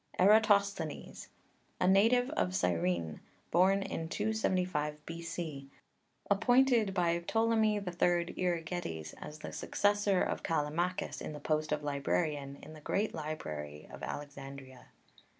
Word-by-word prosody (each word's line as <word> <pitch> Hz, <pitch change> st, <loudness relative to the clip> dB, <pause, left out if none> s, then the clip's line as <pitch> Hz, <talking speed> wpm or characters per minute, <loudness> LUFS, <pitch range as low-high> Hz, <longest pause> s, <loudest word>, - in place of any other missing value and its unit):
ERATOSTHENES, 200 Hz, -5 st, +3 dB, 0.5 s
a 180 Hz, -, +2 dB
native 225 Hz, +6 st, +4 dB
of 90 Hz, 0 st, 0 dB
Cyrene, 85 Hz, -2 st, 0 dB, 0.3 s
born 190 Hz, +3 st, +4 dB
in 165 Hz, -3 st, -4 dB
275 180 Hz, -8 st, -1 dB
B.C.; 165 Hz, -4 st, -5 dB, 0.6 s
appointed 235 Hz, +1 st, +4 dB
by 170 Hz, -2 st, +1 dB
Ptolemy 220 Hz, +3 st, +2 dB
III. 175 Hz, -3 st, 0 dB
Euergetes 165 Hz, -, -2 dB
as 150 Hz, -, -7 dB
the 155 Hz, -, -7 dB
successor 205 Hz, -2 st, +2 dB
of -, -, -2 dB
Kallimachus 165 Hz, +4 st, -1 dB
in -, -, -5 dB
the 150 Hz, -, -7 dB
post 155 Hz, +1 st, -1 dB
of 150 Hz, 0 st, 0 dB
librarian 140 Hz, -, -1 dB
in 155 Hz, -, -10 dB
the 155 Hz, -, -12 dB
great 205 Hz, +7 st, 0 dB
library 75 Hz, -, -5 dB
of -, -, -10 dB
Alexandria. 140 Hz, -2 st, -8 dB
165 Hz, 115 wpm, -32 LUFS, 145-200 Hz, 0.6 s, native